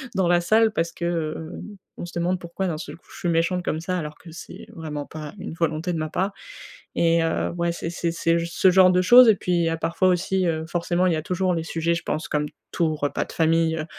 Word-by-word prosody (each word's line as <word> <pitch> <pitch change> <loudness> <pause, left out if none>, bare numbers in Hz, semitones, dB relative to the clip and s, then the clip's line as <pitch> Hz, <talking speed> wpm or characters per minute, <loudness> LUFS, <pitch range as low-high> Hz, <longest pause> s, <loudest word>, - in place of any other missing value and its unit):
dans 190 -2 +2
la 175 0 +3
salle 220 +5 +3
parce 165 -5 -1
que, 170 - -5
heu, 160 -1 -3 0.5
on - - -4
se 175 - -11
demande 180 +2 0
pourquoi 175 +2 -4
d'un 160 -3 -2
seul - - -8
coup, - - -31
je - - -11
suis 175 - -1
méchante 170 +2 +1
comme 155 - -1
ça, 185 +1 -2
alors 155 -3 -5
que 175 - -13
c'est 170 - -10
vraiment 150 -3 -5
pas 155 +1 -8
une 190 -4 -6
volonté 165 +1 -1
de - - -2
ma 155 0 -3
part 190 +5 -1 0.6
et 165 0 +3
heu, 165 - 0
ouais, 170 0 0
c'est 165 -1 -5
c'est 170 0 -2
c'est 165 0 +1
ce 180 +2 +3
genre 185 0 +6
de 180 0 +3
choses 245 +4 +8
et 215 - +6
puis, 180 - -4
il 170 - +2
y - - +1
a 165 - -2
parfois 165 +3 0
aussi, 185 +1 +1
heu, 160 -1 -1
forcément, 175 +1 0
il 175 - +2
y - - 0
a 155 - -2
toujours 180 +1 0
les 165 - -1
sujets, 165 +1 -1
je 170 - -3
pense 155 - -3
comme 150 0 0 0.2
tout 160 -3 0
repas 145 -1 -1
de - - -12
famille, 165 0 +2
heu, 155 - -3
170 Hz, 260 wpm, -24 LUFS, 160-180 Hz, 0.6 s, choses